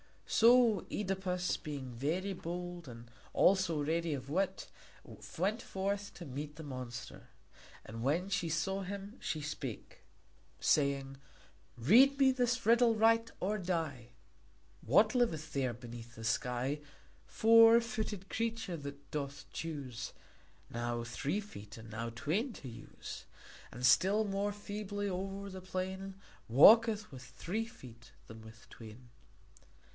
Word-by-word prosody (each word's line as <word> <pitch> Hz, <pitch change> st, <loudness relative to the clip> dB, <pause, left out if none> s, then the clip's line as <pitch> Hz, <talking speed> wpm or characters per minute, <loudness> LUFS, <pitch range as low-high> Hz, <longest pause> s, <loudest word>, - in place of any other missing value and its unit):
So 235 Hz, -2 st, +5 dB
Œdipus, 185 Hz, -3 st, -2 dB
being 140 Hz, -4 st, -6 dB
very 165 Hz, +11 st, -1 dB
bold, 175 Hz, -1 st, -6 dB
and 120 Hz, -1 st, -11 dB, 0.2 s
also 185 Hz, -6 st, +3 dB
ready 165 Hz, +1 st, 0 dB
of 135 Hz, 0 st, -8 dB
wit, 190 Hz, +3 st, -1 dB, 0.7 s
went 205 Hz, +7 st, 0 dB
forth 200 Hz, 0 st, -3 dB
to 175 Hz, -, -8 dB
meet 145 Hz, +3 st, -6 dB
the 160 Hz, -, -9 dB
monster. 130 Hz, -3 st, -7 dB, 0.6 s
And 115 Hz, +1 st, -7 dB
when 160 Hz, +9 st, 0 dB
she 175 Hz, -3 st, 0 dB
saw 190 Hz, +5 st, -1 dB
him 200 Hz, +4 st, -6 dB
she 155 Hz, -, -3 dB
spake, 145 Hz, -5 st, -6 dB, 0.6 s
saying: 140 Hz, -2 st, +1 dB, 0.6 s
"Read 245 Hz, -, +6 dB
me 270 Hz, -1 st, +5 dB
this 250 Hz, -2 st, 0 dB
riddle 230 Hz, 0 st, +5 dB
right, 225 Hz, +1 st, +4 dB
or 210 Hz, +3 st, -1 dB
die: 160 Hz, -10 st, -3 dB, 0.7 s
What 205 Hz, -, +4 dB
liveth 165 Hz, -, 0 dB
there 130 Hz, -3 st, 0 dB
beneath 120 Hz, 0 st, -10 dB
the 115 Hz, -, -9 dB
sky, 125 Hz, +5 st, -1 dB, 0.5 s
Four 230 Hz, +1 st, +7 dB
footed 220 Hz, -5 st, -4 dB
creature 225 Hz, -6 st, -2 dB
that 140 Hz, -1 st, -9 dB
doth 140 Hz, -2 st, -4 dB
choose 135 Hz, -7 st, -5 dB, 0.6 s
Now 120 Hz, 0 st, -2 dB
three 145 Hz, -, -2 dB
feet 105 Hz, -, -11 dB
and 110 Hz, 0 st, -11 dB
now 115 Hz, +2 st, -4 dB
twain 170 Hz, -, -1 dB
to 135 Hz, -, -9 dB
use, 115 Hz, -, -9 dB, 0.5 s
And 125 Hz, +1 st, -3 dB
still 190 Hz, +12 st, +5 dB
more 200 Hz, 0 st, -1 dB
feebly 205 Hz, 0 st, -4 dB
o'er 195 Hz, +2 st, -4 dB
the 185 Hz, 0 st, -8 dB
plain 190 Hz, +1 st, -4 dB, 0.3 s
Walketh 215 Hz, -, +6 dB
with 130 Hz, -2 st, -9 dB
three 175 Hz, -, -4 dB
feet 120 Hz, -, -14 dB
than 110 Hz, 0 st, -11 dB
with 110 Hz, +1 st, -14 dB
twain?" 115 Hz, +2 st, -12 dB
175 Hz, 130 wpm, -34 LUFS, 130-205 Hz, 0.7 s, Four